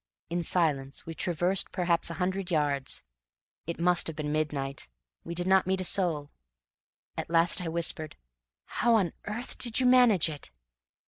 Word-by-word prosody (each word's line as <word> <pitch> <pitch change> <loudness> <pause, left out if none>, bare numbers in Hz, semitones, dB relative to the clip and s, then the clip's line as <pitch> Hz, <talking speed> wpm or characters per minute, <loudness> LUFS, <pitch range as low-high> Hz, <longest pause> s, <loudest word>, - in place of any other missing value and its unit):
In 175 +1 0
silence 150 -6 0
we 165 - -6
traversed 175 +3 0
perhaps 175 -3 0
a 170 - -5
hundred 190 0 -2
yards. 145 -5 -1 0.6
It 170 - -4
must 175 0 +2
have 160 - -4
been 150 -1 -3
midnight. 145 - -2 0.4
We 170 - -6
did 175 +1 0
not 190 0 +3
meet 190 0 0
a - - -2
soul. 170 -5 +1 0.8
At - - -5
last 165 0 +5
I 175 - -4
whispered: 165 -1 -2 0.5
"How 235 0 +1
on 190 -7 +1
earth 225 +4 -6
did 235 -1 +2
you 255 - +2
manage 245 -9 +5
it?" 150 -3 -7
170 Hz, 165 wpm, -28 LUFS, 155-190 Hz, 0.8 s, last